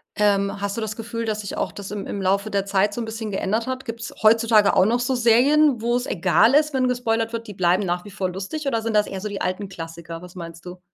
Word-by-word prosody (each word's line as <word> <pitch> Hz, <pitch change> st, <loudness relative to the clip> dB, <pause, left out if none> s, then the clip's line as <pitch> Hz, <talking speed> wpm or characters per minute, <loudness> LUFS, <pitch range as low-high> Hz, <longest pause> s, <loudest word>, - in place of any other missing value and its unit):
Ähm, 200 Hz, -1 st, +1 dB
hast 200 Hz, 0 st, -2 dB
du -, -, -2 dB
das 215 Hz, -1 st, -3 dB
Gefühl, 230 Hz, 0 st, -4 dB
dass 215 Hz, -1 st, -2 dB
sich 200 Hz, -, -6 dB
auch -, -, -1 dB
das 200 Hz, -1 st, -8 dB
im 205 Hz, -1 st, -4 dB
im 200 Hz, -, -4 dB
Laufe 195 Hz, +3 st, +1 dB
der 200 Hz, -2 st, -1 dB
Zeit 200 Hz, +1 st, +1 dB
so 240 Hz, -, -3 dB
'n -, -, -3 dB
bisschen 220 Hz, -1 st, -5 dB
geändert 215 Hz, +4 st, -1 dB
hat? 260 Hz, 0 st, -3 dB
Gibt's 230 Hz, -1 st, -6 dB
heutzutage 220 Hz, -1 st, +5 dB
auch 185 Hz, -, +5 dB
noch 235 Hz, +4 st, +2 dB
so 245 Hz, +2 st, 0 dB
Serien, 250 Hz, +3 st, +4 dB
wo's 240 Hz, +2 st, 0 dB
egal 185 Hz, -, +3 dB
ist, 300 Hz, +1 st, +3 dB
wenn 260 Hz, -1 st, +2 dB
gespoilert 230 Hz, -2 st, 0 dB
wird, 230 Hz, 0 st, -4 dB
die 205 Hz, -, -7 dB
bleiben 185 Hz, +1 st, +2 dB
nach 175 Hz, +1 st, -2 dB
wie 205 Hz, -, -10 dB
vor 190 Hz, -2 st, -2 dB
lustig 195 Hz, -, -5 dB
oder 230 Hz, -5 st, 0 dB
sind 225 Hz, 0 st, -2 dB
das 210 Hz, 0 st, +3 dB
eher 190 Hz, -1 st, -6 dB
so 210 Hz, -, -3 dB
die 200 Hz, -1 st, -5 dB
alten 185 Hz, +2 st, -2 dB
Klassiker, 165 Hz, -2 st, -8 dB
was 180 Hz, 0 st, -12 dB
meinst 170 Hz, -1 st, -9 dB
du? 180 Hz, 0 st, -9 dB
210 Hz, 265 wpm, -23 LUFS, 190-230 Hz, -, heutzutage